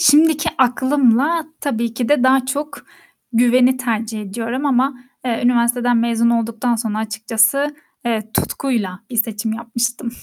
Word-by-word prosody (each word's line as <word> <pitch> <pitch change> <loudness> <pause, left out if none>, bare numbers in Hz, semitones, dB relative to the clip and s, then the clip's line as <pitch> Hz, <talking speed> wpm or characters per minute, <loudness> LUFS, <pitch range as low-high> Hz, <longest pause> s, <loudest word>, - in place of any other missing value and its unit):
şimdiki 310 +2 +4
aklımla, 265 +4 +2
tabii 235 -4 -2
ki 240 0 -2
de 295 -4 +3
daha 260 0 +3
çok 285 +2 -4 0.5
güveni 245 +2 +4
tercih 225 -3 -3
ediyorum 230 +7 -4
ama, 270 0 +2 0.3
eee, 235 -3 -1
üniversiteden 245 0 +2
mezun 235 0 +2
olduktan 230 +1 0
sonra 220 -2 -3
açıkçası, 220 +6 +1 0.3
evet 220 -2 -3
tutkuyla 210 -9 -2
bir 240 - -5
seçim 220 -1 -1
yapmıştım. 235 +2 -3
240 Hz, 130 wpm, -19 LUFS, 225-265 Hz, 0.5 s, şimdiki